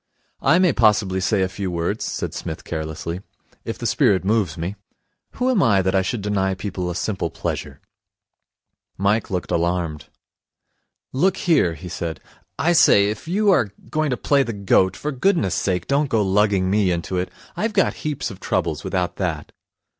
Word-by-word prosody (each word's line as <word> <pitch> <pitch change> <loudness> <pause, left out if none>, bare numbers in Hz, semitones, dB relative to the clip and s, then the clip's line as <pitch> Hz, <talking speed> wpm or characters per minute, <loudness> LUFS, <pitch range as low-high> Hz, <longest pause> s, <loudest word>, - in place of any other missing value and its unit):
'I 165 - +4
may 180 -4 +4
possibly 105 -5 +3
say 95 0 +2
a - - +1
few 95 0 -4
words,' 85 +5 -2
said - - -3
Psmith 80 +2 -6
carelessly, 80 +2 -4 0.4
'if - - -4
the - - -6
spirit 95 -2 +2
moves 100 -6 +1
me. 85 +5 -3 0.6
Who 250 - -1
am 255 -6 +3
I 100 -7 +4
that 95 0 +1
I 95 - +3
should 100 +3 -3
deny 95 -2 0
people 95 -2 -4
a 85 - -4
simple 90 -2 -2
pleasure?' - - -5 1.2
Mike 100 +3 +1
looked 90 -2 -3
alarmed. 85 -3 -1 1.1
'Look 185 +8 +2
here,' 145 - +2
he 80 +4 -9
said, 85 -2 -4 0.4
'I 160 +8 +2
say, 100 -11 +6
if 110 - -8
you 200 +4 +3
are 110 - +2 0.2
going 155 -1 +1
to 125 - -1
play 140 -1 +2
the 115 -4 -2
goat, 95 -2 +2
for 150 - -3
goodness' 135 - +1
sake 90 -2 -1
don't 140 +1 +1
go 110 -5 +2
lugging 95 -1 +2
me 100 -2 +3
into 90 +1 -2
it. 90 - -2 0.3
I've 220 0 -1
got 195 - +2
heaps 150 -2 -3
of - - -10
troubles - - -1
without 90 -2 -2
that.' 85 -6 -3
100 Hz, 175 wpm, -22 LUFS, 90-130 Hz, 1.2 s, say